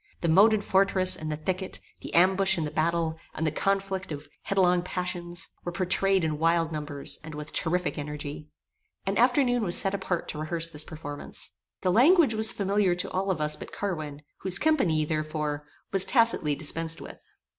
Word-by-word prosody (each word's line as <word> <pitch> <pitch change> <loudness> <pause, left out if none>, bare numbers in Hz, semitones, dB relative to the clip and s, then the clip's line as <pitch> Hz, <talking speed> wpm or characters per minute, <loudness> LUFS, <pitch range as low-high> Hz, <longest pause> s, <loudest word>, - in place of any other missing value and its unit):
The 170 - 0
moated 205 +5 +4
fortress, 190 -1 +4
and 155 0 -5
the - - -1
thicket; 185 +4 -4 0.2
the - - -8
ambush 190 +2 +4
and 160 - -1
the 150 - -5
battle; 165 0 -1 0.2
and 160 - -2
the 155 - +1
conflict 195 +1 -2
of 145 0 -7
headlong 180 -2 +2
passions, 175 -1 -4
were 175 - -4
pourtrayed 190 +1 +2
in 155 -2 -2
wild 165 0 +1
numbers, 150 -2 -4
and 155 -1 -9
with 150 0 -8
terrific 175 -1 -1
energy. 150 0 -6 0.6
An 195 +2 -1
afternoon 245 0 +3
was 175 -3 +4
set 195 - +6
apart 180 -3 -3
to 150 - -4
rehearse 165 +1 -3
this 150 -1 -1
performance. 145 -2 -8 0.3
The 185 - +1
language 280 - +5
was 220 0 +5
familiar 195 -2 +1
to 175 - -3
all 195 +1 -2
of 185 -4 -1
us 150 0 +1
but - - -10
Carwin, 155 -7 -5 0.2
whose 185 -2 +3
company, 190 - +1
therefore, 150 -1 -3 0.2
was 195 -1 +6
tacitly 195 - +2
dispensed 165 +2 -3
with. - - -11
175 Hz, 175 wpm, -27 LUFS, 155-195 Hz, 0.6 s, set